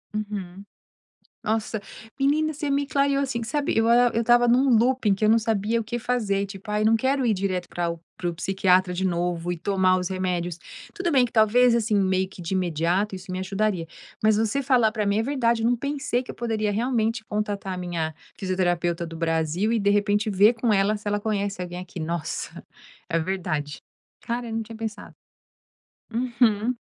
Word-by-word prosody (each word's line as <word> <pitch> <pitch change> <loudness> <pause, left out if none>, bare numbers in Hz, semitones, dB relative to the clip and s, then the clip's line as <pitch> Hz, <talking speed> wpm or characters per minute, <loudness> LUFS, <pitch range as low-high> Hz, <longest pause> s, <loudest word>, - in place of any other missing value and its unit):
Uhum. 200 -3 -5 0.8
Nossa, 220 0 -1 0.4
menina 300 +3 +2
você 295 0 -4
me 280 0 +1
clareou 280 -1 +1
assim, 255 -4 -2
sabe. 280 +6 -1
Eu 225 0 +3
a 245 +1 +5
eu 230 - +1
estava 240 +1 +4
num 255 +3 +4
looping, 235 -3 +2
que 205 +3 -2
eu - - +4
não 225 +1 +6
sabia 225 0 0
o 225 - -5
que 240 +2 -3
fazer, 210 -5 0
tipo: 195 +2 -9
"Ai, 210 0 0
eu 215 - +3
não 225 +1 +5
quero 265 +3 +1
ir 230 - +3
direto 185 -2 -2
para 175 -1 -2
o 170 0 -6 0.2
para 175 - -3
o 170 - -8
psiquiatra 185 0 +2
de 185 +2 -1
novo, 175 -1 -1
e - - -4
tomar 185 +1 +2
os 180 - -2
remédios". 180 -2 -2 0.3
Tudo 375 -5 -2
bem 260 -3 +5
que 240 - -4
talvez, 235 +2 +5
assim, 220 -2 0
meio 190 -1 +1
que 185 - -11
de 170 +3 -3
imediato, 180 +3 0
isso 185 0 -9
me 185 - -3
ajudaria. 190 -2 -1 0.4
Mas 215 -1 +4
você 225 +5 +1
falar 245 -5 +3
para 215 -2 -2
mim 200 +1 +2
é 220 - +2
verdade, 235 -4 +1
eu - - +2
não 245 - +2
pensei 280 -1 -2
que - - -8
eu - - -15
poderia 220 -3 -1
realmente 225 -1 0
contatar 205 -3 -3
a - - -6
minha 170 -3 -3 0.2
fisioterapeuta 175 -2 -1
do 165 0 -8
Brasil, 165 +5 0
e 230 - +2
de 200 -1 +2
repente 205 +1 +2
ver 205 +4 +5
com 230 -1 +1
ela 200 +2 +2
se 210 - -14
ela 205 0 0
conhece 200 -3 -2
alguém 175 0 -6
aqui. 180 -1 -8
Nossa, 165 0 -4 0.4
é 165 - +1
verdade. 160 -4 -3 0.4
Cara, 235 0 -3
eu - - -6
não 225 - -1
tinha 225 +1 -10
pensado. 220 -2 -6 1.0
Uhum. 235 -1 +1
210 Hz, 205 wpm, -25 LUFS, 185-235 Hz, 1.0 s, não